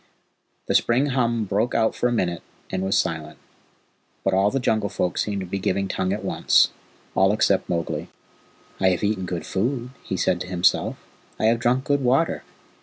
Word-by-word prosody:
The - - -1
spring 120 +4 +3
hum 120 -3 +1
broke 105 +5 0
out 110 -1 +2
for - - 0
a - - -1
minute, 90 -7 -1 0.3
and 95 - -1
was 95 +1 +1
silent, 80 -1 -2 0.9
but 95 - +1
all 95 +2 +4
the 135 - -1
Jungle 110 -4 +1
Folk 90 - -1
seemed 100 -2 -1
to - - -4
be 95 +2 -3
giving 95 +1 0
tongue 95 0 -1
at 105 - -3
once. - - +3 0.4
All 95 +1 +4
except 105 -2 +2
Mowgli. 85 -2 -2 0.7
"I 95 - +4
have 90 0 -1
eaten 100 -3 0
good 90 -2 -4
food," 120 +5 -2
he 95 - -3
said 90 0 +1
to - - -5
himself. 90 -1 +1 0.4
"I - - 0
have 115 +1 +3
drunk 125 +3 +1
good 145 0 +1
water. 135 +6 +2
100 Hz, 185 wpm, -23 LUFS, 95-120 Hz, 0.9 s, all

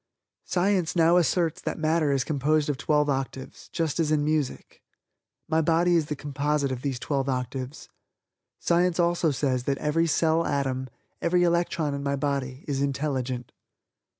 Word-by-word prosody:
Science 185 -2 +1
now 170 0 +5
asserts 175 0 +1
that - - -3
matter 155 -2 +1
is 135 -2 +1
composed 150 +1 +1
of 145 - +1
twelve 150 +1 +1
octaves, 135 -1 -4
just 165 -2 -1
as 155 -2 +1
in 150 -1 +2
music. 150 -3 -2 0.7
My 160 0 +2
body 170 +2 +3
is 160 -3 +2
the 150 - -3
composite 145 0 -1
of 125 -1 -4
these 135 -2 -2
twelve 135 +1 -2
octaves. 130 +2 -4 0.7
Science 175 0 +1
also 170 -1 +2
says 130 -3 -1
that 140 -1 0
every 165 +4 +1
cell 160 +1 +2
atom, 130 -3 -1 0.3
every 175 +1 +2
electron 170 -3 +1
in 140 - -3
my 140 0 -1
body 135 -1 -3
is 140 -2 -1
intelligent. 130 -3 -2
150 Hz, 155 wpm, -26 LUFS, 135-165 Hz, 0.7 s, now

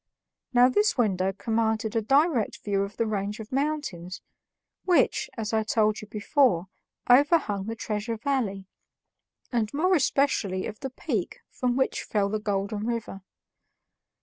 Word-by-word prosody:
Now 245 -1 +6
this 415 +10 +2
window 195 -5 +1
commanded 220 +1 -1
a 225 - +2
direct 275 0 +2
view 200 -1 0
of 200 +1 -4
the 230 - +1
range 210 0 -3
of 220 0 -9
mountains 265 - -2 0.6
which, 345 -8 +2
as 225 0 -3
I 220 - +3
told 215 -1 +1
you 215 - -10
before, 210 - +1 0.4
overhung 250 - +3
the 225 - -3
Treasure 220 +1 -3
Valley, 220 -6 -1 0.9
and 230 -3 0
more 365 +6 +2
especially 260 - +1
of 215 -1 -7
the 270 - -4
peak 260 - -3
from 250 -2 -1
which 265 - 0
fell 200 -2 0
the 215 +1 -1
Golden 205 0 -2
River. 225 -4 -4
220 Hz, 145 wpm, -26 LUFS, 205-260 Hz, 0.9 s, Now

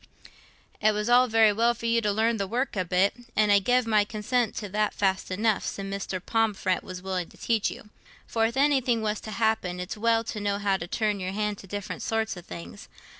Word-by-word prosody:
"It 215 0 +4
was 210 +2 -2
all 250 +1 +6
very 220 -2 +5
well 235 +3 +2
for 230 - -8
you 230 0 +2
to 210 -2 +1
learn 225 +2 +1
the 200 -1 -2
work 245 +6 -2
a 185 - 0
bit—an' 205 +4 +1
I 200 - +6
gev 245 +4 +2
my 215 -2 +3
consent 220 +2 -1
to 215 -2 -4
that 210 +2 0
fast 190 -2 0
enough, 210 +2 +1
sin' 195 0 -4
Mrs. 195 -2 -4
Pomfret 210 -5 +1
was 185 0 -8
willing 185 -2 -3
to - - -18
teach 225 -3 +1
you. 210 - -11 0.3
For 225 -1 +1
if 235 +3 -6
anything 265 -5 +2
was 210 0 -1
t' - - -8
happen, 215 -4 0
it's 180 +1 -4
well 225 +1 +2
to 220 -1 -5
know 205 -1 -1
how 200 -1 +1
to 165 - -6
turn 210 +1 -1
your 185 0 -3
hand 210 0 -2
to 195 - -12
different 205 +1 -5
sorts 225 -1 -1
o' 175 - -8
things. 85 - -10
210 Hz, 225 wpm, -27 LUFS, 195-225 Hz, 0.3 s, all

